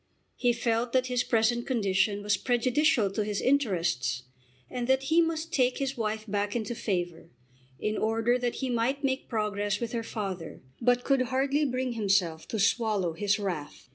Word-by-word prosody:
He 245 Hz, -, +2 dB
felt 235 Hz, 0 st, 0 dB
that 255 Hz, -1 st, +3 dB
his 245 Hz, 0 st, +2 dB
present 235 Hz, +1 st, +1 dB
condition 205 Hz, -3 st, +1 dB
was 205 Hz, 0 st, +2 dB
prejudicial 250 Hz, -1 st, +2 dB
to 210 Hz, +2 st, -1 dB
his 205 Hz, -1 st, -2 dB
interests, 170 Hz, -, +1 dB, 0.4 s
and 245 Hz, -1 st, -4 dB
that 265 Hz, 0 st, +3 dB
he 320 Hz, +5 st, +4 dB
must 330 Hz, 0 st, -2 dB
take 255 Hz, -2 st, +2 dB
his 275 Hz, 0 st, -2 dB
wife 220 Hz, -2 st, -2 dB
back 205 Hz, +1 st, -1 dB
into 230 Hz, 0 st, -2 dB
favour, 175 Hz, -7 st, -3 dB, 0.5 s
in 215 Hz, 0 st, -1 dB
order 225 Hz, +3 st, +1 dB
that 245 Hz, -1 st, -1 dB
he 265 Hz, -, -3 dB
might 245 Hz, +4 st, 0 dB
make 265 Hz, 0 st, -1 dB
progress 205 Hz, -2 st, -1 dB
with 235 Hz, -2 st, -3 dB
her 235 Hz, -, -1 dB
father, 195 Hz, -, -5 dB, 0.2 s
but 245 Hz, +1 st, +3 dB
could 275 Hz, -2 st, +2 dB
hardly 270 Hz, +4 st, +1 dB
bring 255 Hz, -2 st, -1 dB
himself 195 Hz, -7 st, +1 dB
to 225 Hz, -, -3 dB
swallow 205 Hz, -4 st, +1 dB
his 200 Hz, +4 st, +1 dB
wrath. 175 Hz, -10 st, -5 dB
230 Hz, 170 wpm, -28 LUFS, 205-255 Hz, 0.5 s, he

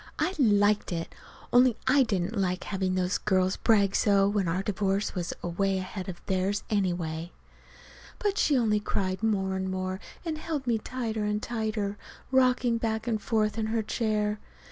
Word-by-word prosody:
I 370 Hz, -, 0 dB
liked 205 Hz, -5 st, +3 dB
it 165 Hz, -1 st, -4 dB, 0.4 s
only 245 Hz, -1 st, +5 dB
I 275 Hz, +2 st, +5 dB
didn't 200 Hz, -3 st, 0 dB
like 185 Hz, -3 st, 0 dB
to -, -, -9 dB
have 190 Hz, -2 st, -1 dB
those 185 Hz, +1 st, 0 dB
girls 185 Hz, -2 st, +1 dB
brag 200 Hz, -3 st, +3 dB
so, 200 Hz, -2 st, +4 dB
when 200 Hz, -2 st, 0 dB
our 180 Hz, +3 st, 0 dB
divorce 200 Hz, 0 st, 0 dB
was 175 Hz, -2 st, -3 dB
away 190 Hz, +3 st, 0 dB
ahead 185 Hz, 0 st, -5 dB
of 175 Hz, -, -9 dB
theirs, 190 Hz, +2 st, 0 dB
anyway. 175 Hz, -4 st, -1 dB, 0.9 s
But 410 Hz, -1 st, -1 dB
she 285 Hz, -, +3 dB
only 215 Hz, -3 st, +2 dB
cried 190 Hz, -2 st, -2 dB
more 195 Hz, -4 st, +1 dB
and 190 Hz, 0 st, -2 dB
more, 185 Hz, 0 st, -3 dB, 0.3 s
and 315 Hz, -2 st, -3 dB
held 310 Hz, -4 st, -3 dB
me 235 Hz, -3 st, +1 dB
tighter 225 Hz, -2 st, -3 dB
and 210 Hz, 0 st, 0 dB
tighter, 215 Hz, -3 st, -3 dB, 0.3 s
rocking 250 Hz, -2 st, +3 dB
back 220 Hz, -1 st, -1 dB
and 225 Hz, -3 st, -1 dB
forth 215 Hz, 0 st, 0 dB
in 220 Hz, -, 0 dB
her 225 Hz, 0 st, 0 dB
chair. 210 Hz, -1 st, -1 dB
205 Hz, 170 wpm, -28 LUFS, 190-225 Hz, 0.9 s, only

